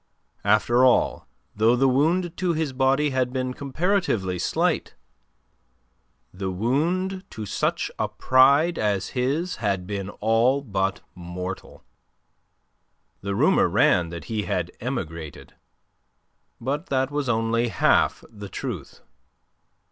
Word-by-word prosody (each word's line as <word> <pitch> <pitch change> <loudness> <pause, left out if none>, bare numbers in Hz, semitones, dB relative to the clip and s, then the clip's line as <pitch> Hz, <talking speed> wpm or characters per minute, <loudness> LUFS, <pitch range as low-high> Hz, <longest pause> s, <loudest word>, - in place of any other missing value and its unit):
After 110 +4 +3
all, 130 - +3 0.3
though 110 +3 +4
the 135 +2 +3
wound 165 +7 +1
to 180 -2 0
his 155 -4 -2
body 135 +3 +2
had 130 -1 0
been 130 -1 -2
comparatively 140 - -1
slight, - - 0 1.4
the 95 0 -4
wound 165 - -1
to 110 - -7
such 100 - -1
a - - +1
pride 140 +6 +4
as 100 -2 0
his 140 +8 -1
had 100 -4 -1
been 100 0 -4
all 115 +6 +1
but 95 -5 -1
mortal. 90 +2 -7 1.4
The 100 0 -3
rumour - - +4
ran 85 -2 +3
that 85 0 -7
he 110 -3 -3
had 90 0 -2
emigrated. 85 - -6 1.1
But 145 +8 -3
that 135 0 0
was 145 -3 -2
only 115 +1 +1
half 110 - +2
the 105 -3 -10
truth. - - -6
120 Hz, 120 wpm, -24 LUFS, 100-140 Hz, 1.4 s, though